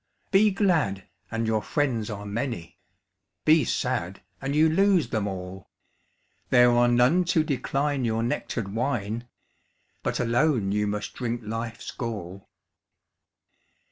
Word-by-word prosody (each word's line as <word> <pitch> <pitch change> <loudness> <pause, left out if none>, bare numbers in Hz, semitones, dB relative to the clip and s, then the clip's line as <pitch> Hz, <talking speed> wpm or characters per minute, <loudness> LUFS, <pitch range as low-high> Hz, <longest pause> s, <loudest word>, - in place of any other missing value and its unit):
Be 210 +2 +5
glad, 165 - +1 0.2
and 115 0 -2
your 110 -1 +1
friends 120 -3 -1
are 105 -1 -6
many; 105 -5 -4 0.7
Be 155 0 +6
sad, 100 -8 -2 0.2
and 135 +1 -2
you 155 +1 +5
lose 190 +1 +3
them 110 -3 -1
all; 95 -1 -7 0.8
There 125 0 +6
are 120 0 +4
none 125 +9 +4
to 170 -2 +2
decline 140 -1 -1
your 115 -1 0
nectar'd 115 -3 -3
wine, 120 -2 -2 0.7
But - - -2
alone 120 -3 +2
you 105 +1 +1
must 105 0 -3
drink 120 -1 -3
life's 115 +1 -5
gall. 100 -5 -6
120 Hz, 125 wpm, -26 LUFS, 105-145 Hz, 0.8 s, Be